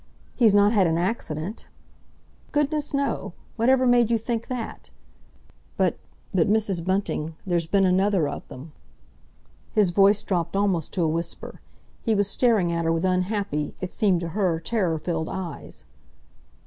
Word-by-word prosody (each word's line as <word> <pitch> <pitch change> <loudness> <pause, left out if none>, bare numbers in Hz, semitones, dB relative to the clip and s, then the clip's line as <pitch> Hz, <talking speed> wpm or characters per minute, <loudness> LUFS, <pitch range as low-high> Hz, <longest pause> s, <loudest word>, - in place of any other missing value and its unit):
He's 225 -5 +4
not 205 +2 +5
had 195 -5 +4
an 165 0 +1
accident?" 175 0 -3 0.8
"Goodness, 295 0 0
no! 280 0 -2 0.2
Whatever 255 +3 +3
made 240 -2 +4
you 235 - +3
think 230 +1 -3
that? 250 -3 -6 0.9
But—but, 180 -4 -1
Mrs. 205 -4 +1
Bunting, 185 -4 -1
there's 170 -3 0
been 195 +2 +3
another 185 -2 +2
of 145 - -6
them!" 140 +5 -10 1.0
His 205 -5 +3
voice 200 +3 +4
dropped 180 -1 -1
almost 195 -6 0
to 180 - 0
a - - +2
whisper. 165 +2 -4 0.4
He 225 -3 +1
was 200 -1 +2
staring 210 -5 +2
at 170 0 -1
her 165 - +2
with 165 +2 0
unhappy, 185 -4 -1
it 185 -1 -5
seemed 190 -5 +1
to 170 - -3
her 180 -3 0
terror 175 -2 -1
filled, 160 0 -3
eyes. 180 -6 -7
190 Hz, 150 wpm, -24 LUFS, 170-220 Hz, 1.0 s, not